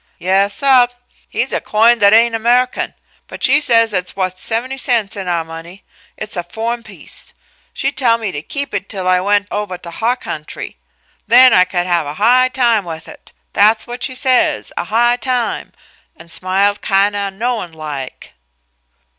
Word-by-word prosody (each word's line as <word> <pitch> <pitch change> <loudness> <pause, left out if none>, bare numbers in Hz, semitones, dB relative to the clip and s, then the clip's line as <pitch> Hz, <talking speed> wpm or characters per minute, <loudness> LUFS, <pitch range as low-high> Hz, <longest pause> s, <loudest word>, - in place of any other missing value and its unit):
"Yes, 195 +3 +1
sub. 260 -3 +4 0.4
Heh's - - -1
a - - 0
coin 230 +2 +3
that 200 -1 +5
ain' 230 +2 +5
Amehican, 240 +3 +1 0.3
but - - -10
she 285 +3 +5
says 230 -5 +3
it's 180 -1 -2
wuth 185 -1 -3
seventy 250 +6 -3
cents 230 -6 0
in 195 -2 -5
our 170 -2 -1
money. 165 +4 -11 0.3
It's 215 -1 -4
a 175 - -1
foh'en 225 +7 -4
piece. 210 -3 -11 0.4
She - - -2
tell 235 -4 +2
me 220 -4 -4
to 145 - -4
keep 280 - -5
it 200 -1 -4
till 190 -3 -4
I 185 0 +3
went 205 +1 +1
ovah 205 -3 -3
to 170 -1 -10
huh 230 +7 0
country; 155 -10 -7 0.5
then 250 +1 +7
I 180 - +5
could 180 -1 -1
have 175 -4 0
a 145 - -6
high 250 +6 +4
time 235 -5 +1
with 165 -2 -8
it - - -14 0.2
that's 215 +2 +3
what 245 +1 -8
she 260 - -3
says 255 -1 +1
'a - - -3
high 240 +2 +2
time' 250 -2 -2 0.5
an' 165 +1 -14
smiled 190 +4 0
kind 200 +1 +2
o' 200 -1 -2
knowin' 220 -2 -3
like." 150 -4 -7
210 Hz, 180 wpm, -16 LUFS, 185-240 Hz, 0.5 s, then